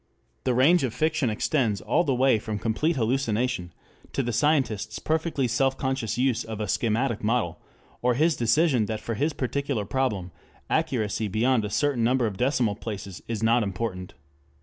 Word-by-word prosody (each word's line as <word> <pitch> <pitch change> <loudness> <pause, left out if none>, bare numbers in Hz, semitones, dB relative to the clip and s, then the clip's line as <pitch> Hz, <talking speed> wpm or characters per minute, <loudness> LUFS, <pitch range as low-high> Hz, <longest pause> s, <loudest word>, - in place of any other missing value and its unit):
The 125 -2 +2
range 150 +6 +5
of 125 -4 -2
fiction 155 -4 +1
extends 110 -1 0
all - - +1
the 140 -6 0
way 130 -3 +3
from 110 -1 -4
complete 115 +10 0
hallucination 120 -5 0 0.4
to 135 - 0
the 120 -1 -2
scientists' 115 -5 +1
perfectly 160 -4 0
self 135 +3 +1
conscious 130 -5 -2
use 125 -2 +1
of 110 -1 -6
a 105 - -2
schematic 115 +3 0
model, 105 -7 0 0.4
or 125 0 +2
his 160 +4 +3
decision 120 -1 +2
that 110 0 -3
for 115 - -4
his 145 +7 0
particular 135 -4 -2
problem 105 -7 -1 0.4
accuracy 110 -3 0
beyond 110 +3 +2
a - - -3
certain 140 0 +1
number 125 +1 +2
of 105 -3 -2
decimal 125 -3 +1
places 100 -3 -7
is 115 -2 -3
not 115 +2 +4
important. 95 -2 -4
120 Hz, 170 wpm, -26 LUFS, 110-135 Hz, 0.4 s, range